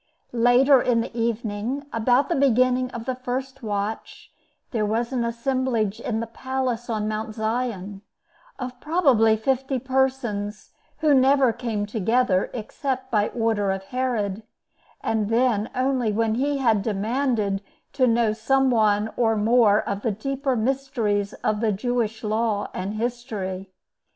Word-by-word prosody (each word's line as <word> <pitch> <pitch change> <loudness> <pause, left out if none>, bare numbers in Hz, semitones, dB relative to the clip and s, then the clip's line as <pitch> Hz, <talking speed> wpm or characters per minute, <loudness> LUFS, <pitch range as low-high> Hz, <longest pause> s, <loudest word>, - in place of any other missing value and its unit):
Later 245 +3 +5
in 235 -2 +2
the 230 - -6
evening, 230 +3 -2
about 245 +4 +3
the 340 - 0
beginning 255 -1 +3
of 235 -2 -7
the 255 - -1
first 260 +1 -5
watch, 210 0 -4 0.4
there 225 -4 0
was 230 +4 -1
an 245 -2 0
assemblage 235 -3 -1
in 230 -4 -2
the - - -2
palace 250 0 -3
on 215 -2 -1
Mount 215 0 -3
Zion, 220 -4 -3 0.6
of 255 -1 -6
probably 265 -10 +3
fifty 265 +3 0
persons, 255 -5 -1 0.3
who 305 -2 +4
never 265 -2 +4
came 220 -4 -3
together 215 -1 +1
except 260 +3 -4
by 210 -2 +2
order 225 -4 0
of 190 0 -2
Herod, 225 -4 -2 0.6
and 215 -2 0
then 230 -2 +2
only 255 -3 +1
when 220 +1 +1
he 280 +4 0
had 225 -6 +2
demanded 215 -1 0 0.3
to 255 -2 +3
know 230 -2 +2
some 265 +4 +2
one 215 -2 +2
or 225 -2 +2
more 215 -1 +4
of 200 0 -3
the 230 - 0
deeper 270 +5 -2
mysteries 225 -5 -1
of 210 -1 +1
the 225 -1 +1
Jewish 225 +1 -2
law 215 -1 -1
and 195 +3 -4
history. 215 -5 -4
230 Hz, 140 wpm, -24 LUFS, 215-255 Hz, 0.6 s, Later